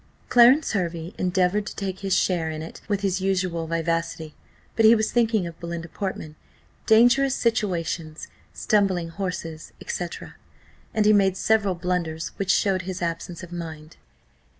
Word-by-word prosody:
Clarence 250 +5 +6
Hervey 170 -4 -3
endeavoured 185 +3 +1
to - - -6
take 190 -2 -4
his 195 -1 +1
share 170 -4 +1
in 155 0 -5
it 165 - -10
with 205 -2 -1
his 190 -2 0
usual 185 -4 -1
vivacity, 165 -1 -2 0.4
but 225 - +2
he 220 +1 +8
was 220 -1 0
thinking 225 -5 +2
of 170 -1 -8
Belinda 170 0 -6
Portman, 175 -6 -5 0.5
dangerous 245 +4 +5
situations, 170 -8 -2 0.2
stumbling 190 -5 +1
horses, 170 -3 -5
&c 175 - -3 0.9
and 215 -1 +2
he 215 - +6
made 195 -2 +3
several 205 -2 +2
blunders, 170 -2 -2
which 195 -1 -3
showed 195 -3 +2
his 185 0 -5
absence 170 +1 -4
of 180 - -10
mind. 160 -2 -8
185 Hz, 150 wpm, -24 LUFS, 165-205 Hz, 0.9 s, he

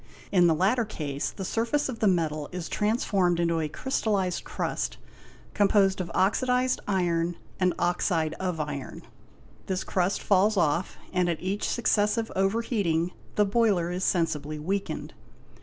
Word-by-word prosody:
In 180 -3 +5
the 165 - +3
latter 205 +9 +2
case 145 -9 -3
the 190 - -6
surface 235 +9 0
of 245 -4 -5
the 215 - +3
metal 155 -5 0
is 180 -2 -5
transformed 200 -5 +1
into 170 -1 +1
a 155 -1 -1
crystallized 200 - -1
crust, - - -3 0.6
composed 195 -2 +3
of 175 - -5
oxidized 250 +5 +2
iron 175 -3 +1 0.2
and 180 -2 +2
oxide 170 -2 +1
of 180 -3 -2
iron; 145 -3 -5 0.6
this 190 -1 -1
crust 185 +1 0
falls 205 +2 +3
off 170 +1 +1 0.2
and 180 -1 +2
at 165 - -1
each 195 +3 -2
successive 220 -1 +1
over 195 +4 +1
heating 175 -7 0 0.2
the 210 - +4
boiler 200 -5 +2
is 180 +1 -3
sensibly 155 -4 0
weakened. 195 +6 -3
185 Hz, 145 wpm, -27 LUFS, 170-210 Hz, 0.6 s, In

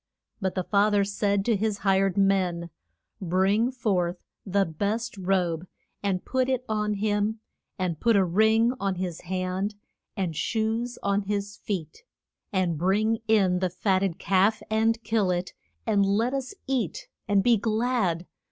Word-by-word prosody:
But 190 -1 -1
the 185 - 0
fa 205 +3 +3
ther 205 -1 +3
said 200 0 0
to 230 - +3
his 210 0 -1
hired 195 -1 +2
men, 185 -4 +1 0.5
Bring 195 +6 +2
forth 185 -8 -1 0.2
the 195 +1 +2
best 205 +9 -2
robe 180 -3 0 0.3
and 195 -3 -1
put 260 0 0
it 255 -1 0
on 210 -1 0
him, 210 +1 0 0.4
and 180 -4 -2
put 230 -2 +3
a 195 -2 +4
ring 220 +6 +3
on 195 -1 -1
his 180 -2 -4
hand, 185 +3 -2 0.4
and 180 -5 -1
shoes 225 +6 -1
on 200 0 +1
his 205 0 -3
feet. 170 -7 -5 0.5
And 180 -5 0
bring 215 +5 +2
in 195 -5 +3
the 185 0 0
fat 185 +2 +1
ted 190 -4 -1
calf, 200 +3 +2
and 220 +1 +2
kill 215 -3 +1
it, 180 0 -1 0.3
and 205 -3 +3
let 215 +6 +1
us 270 +6 -3
eat 255 - -2 0.2
and 200 -1 +3
be 240 -2 +5
glad. 215 -5 0
200 Hz, 155 wpm, -26 LUFS, 185-220 Hz, 0.5 s, be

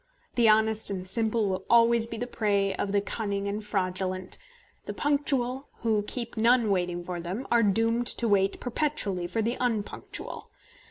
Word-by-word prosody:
The 235 -2 +4
honest 220 0 +4
and 185 -2 -3
simple 220 +2 +1
will 190 -1 -2
always 235 -1 +5
be 230 - -6
the 245 - -3
prey 200 -4 0
of 195 - -3
the 200 0 +2
cunning 200 -1 -3
and 205 +2 -3
fraudulent. 185 -2 -2 0.5
The - - -5
punctual, 275 -2 0
who 220 -2 +2
keep 235 -2 -4
none 230 -1 +3
waiting 175 -2 -1
for 175 0 -5
them, 185 +10 -5
are 235 -1 +5
doomed 230 +3 +2
to 235 - +3
wait 195 -2 +2
perpetually 235 - -2
for 225 +4 -1
the 235 +3 -1
unpunctual. 225 -5 -4
215 Hz, 165 wpm, -27 LUFS, 195-235 Hz, 0.5 s, always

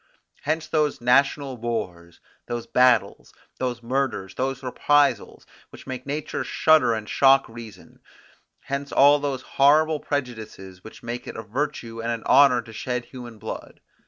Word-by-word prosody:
Hence 155 +2 -2
those 150 -2 0
national 135 +2 +2
wars, 95 -8 -5 0.3
those 120 -1 -4
battles, 125 -1 +2 0.2
those 125 -2 -3
murders, 120 -6 -2
those 130 0 -3
reprisals, 145 +3 +1 0.2
which - - -14
make 130 0 -7
nature 145 +1 -3
shudder 155 -7 +3
and 110 -1 -6
shock 135 +2 +4
reason; 115 -5 -12 0.6
hence 140 +1 -5
all 145 +1 +5
those 140 -3 -3
horrible 155 +3 +3
prejudices, 110 -10 -6
which 110 - -13
make 120 +1 -6
it - - -7
a 110 - -6
virtue 115 -1 -4
and 115 +1 -2
an 115 -1 -4
honour 130 -3 +5
to 110 - -13
shed 125 +2 -4
human 120 -3 -11
blood. - - -8
125 Hz, 145 wpm, -24 LUFS, 115-140 Hz, 0.6 s, all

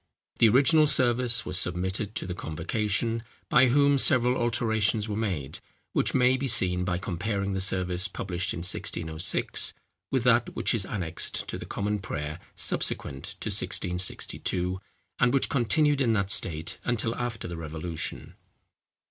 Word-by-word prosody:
The 115 - +6
original 150 +6 +5
service 125 -3 +3
was 90 0 +1
submitted 95 +3 -2
to - - -3
the 90 - -4
convocation, 105 +8 -1 0.3
by 130 - +5
whom 140 +2 +3
several 125 -1 +4
alterations 110 -2 +1
were 105 - -3
made, 95 -11 -3 0.3
which - - +1
may 130 0 +4
be 135 +1 -2
seen 90 -7 +3
by 90 -1 -1
comparing 100 +2 -3
the 95 - -2
service 95 0 0
published 90 0 -3
in 85 - -5
1606 80 -2 0 0.3
with 130 -3 0
that 120 -1 +2
which - - +1
is 105 -4 -1
annexed 85 -6 -2
to - - -4
the - - -8
Common 105 +1 -2
Prayer 75 -3 -5 0.2
subsequent 70 0 -2 0.2
to - - -3
1662, 90 0 0 0.4
and 125 +2 +3
which 135 - +2
continued 145 +3 +2
in 115 -4 +2
that 100 -2 0
state 80 -3 -1
until 115 -1 -1
after 120 -4 -4
the 85 - -6
Revolution. 80 0 -5
105 Hz, 150 wpm, -27 LUFS, 90-120 Hz, 0.4 s, The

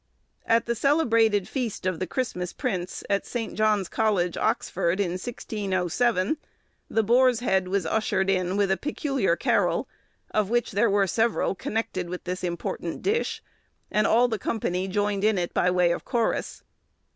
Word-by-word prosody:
At 230 0 +3
the 235 - 0
celebrated 230 - +2
feast 245 -8 -3
of 185 -3 -1
the 185 - -2
'Christmas 180 -6 -3
Prince,' 190 -9 -3
at 200 0 +1
St. 235 -2 -4
John's 215 -3 +2
College, 200 -6 +1
Oxford, 200 -5 0
in 190 -4 +1
1607, 200 - -1 0.5
the 225 - +2
boar's 245 +2 +4
head 190 -6 +1
was 190 -1 0
ushered 190 0 0
in 185 0 +1
with 200 -1 +2
a 190 - +2
peculiar 275 - 0
carol, - - +1 0.4
of 210 -2 +1
which 240 +1 +1
there 215 +3 +2
were 200 0 +3
several 225 +3 +1
connected 185 -3 -3
with 180 0 -5
this 185 +1 -4
important 170 -1 -4
dish, 435 +4 0 0.5
and 215 - +2
all 240 +2 +4
the 220 -3 -2
company 185 -3 -1
joined 205 0 0
in 215 -1 +3
it 175 -1 -2
by 180 - +2
way 180 -1 +3
of 170 - -2
chorus. 235 -3 -1
205 Hz, 160 wpm, -26 LUFS, 185-230 Hz, 0.5 s, boar's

